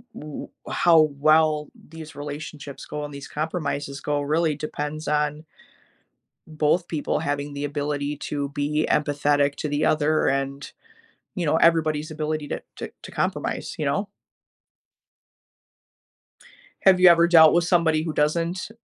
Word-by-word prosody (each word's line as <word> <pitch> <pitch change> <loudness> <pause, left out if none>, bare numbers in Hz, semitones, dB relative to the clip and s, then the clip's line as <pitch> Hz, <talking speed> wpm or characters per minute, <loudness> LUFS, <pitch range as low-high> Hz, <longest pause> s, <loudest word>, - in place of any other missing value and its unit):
w 150 -1 -8
w - - -32 0.2
how 165 -2 +5 0.2
well 155 -1 +3 0.2
these 160 -1 -10
relationships 145 -1 -7
go 150 0 -5
and 145 - -9
these 140 0 -8
compromises 145 -3 -4
go 145 -1 -1
really 155 +2 +1
depends 150 +1 -5
on 150 +1 -1 1.0
both 155 +3 0
people 155 -3 -1
having 145 0 -3
the 140 0 -4
ability 145 0 -2
to 145 -1 -4
be 145 +2 -1
empathetic 145 -1 +1
to 150 - -3
the 145 +1 0
other 155 0 +2
and, 135 +1 -2 0.6
you 175 -5 -2
know, 150 - +2
everybody's 155 -2 +2
ability 155 -1 -3
to - - -4
to - - -6
to - - -9
compromise, - - -3
you 150 - -2
know? 195 +8 -1 2.7
Have 190 -2 +5
you 180 - +9
ever 170 0 +6
dealt 160 -2 +7
with 170 0 +3
somebody 165 -3 +2
who 160 -1 -3
doesn't 165 +5 0
150 Hz, 140 wpm, -24 LUFS, 145-160 Hz, 2.7 s, you